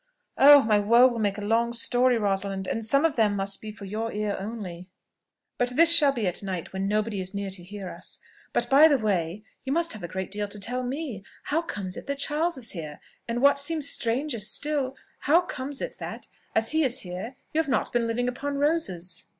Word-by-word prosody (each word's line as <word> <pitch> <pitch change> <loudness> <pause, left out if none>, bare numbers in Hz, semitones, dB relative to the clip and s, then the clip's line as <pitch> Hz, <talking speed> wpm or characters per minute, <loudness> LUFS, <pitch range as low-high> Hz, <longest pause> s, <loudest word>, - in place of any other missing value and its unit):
"Oh! 285 0 +9
my 215 -2 +3
woes 235 +5 +5
will 235 - -4
make 205 -2 0
a - - -5
long 230 +3 +1
story, 245 +1 +3
Rosalind; 195 -2 -1
and 225 +4 -3
some 275 +7 +2
of 325 - +1
them 215 -3 +2
must 195 0 0
be 215 - -7
for 210 -1 -11
your 220 +3 -3
ear 210 -1 -2
only; 190 -4 -7 0.7
but 245 0 0
this 335 +2 +6
shall 295 -4 +6
be 235 -6 -3
at 180 -1 -1
night, 190 -4 -5
when 190 +1 -2
nobody 210 -1 -1
is 185 +2 -3
near 200 -1 -3
to 185 -2 -3
hear 195 +1 -8
us: - - -7 0.3
but, 240 - 0
by 280 +5 +7
the 290 -3 +3
way, 200 -3 -1 0.2
you 265 - -4
must 335 +1 +1
have 215 - -9
a 175 - -5
great 190 +2 -5
deal 205 +1 -1
to 205 +1 -6
tell 245 +5 -2
me. 255 - -5 0.2
How 320 +3 0
comes 195 - -5
it - - -9
that 280 0 -2
Charles 305 +3 0
is 235 -3 -2
here? 155 -5 -7 0.3
And, 240 +2 -2
what 280 0 +5
seems 295 0 +1
stranger 245 +1 -1
still, 270 +5 0 0.2
how 325 +5 +4
comes 285 -6 -4
it - - -5
that, - - -7 0.3
as 220 0 +2
he 315 +1 +2
is 255 -3 +1
here, 185 +7 -7 0.2
you 315 - +1
have 310 - -6
not 260 - 0
been 235 -1 +1
living 240 +2 -1
upon 280 +3 -3
roses?" 280 - 0
230 Hz, 225 wpm, -26 LUFS, 200-280 Hz, 0.7 s, Oh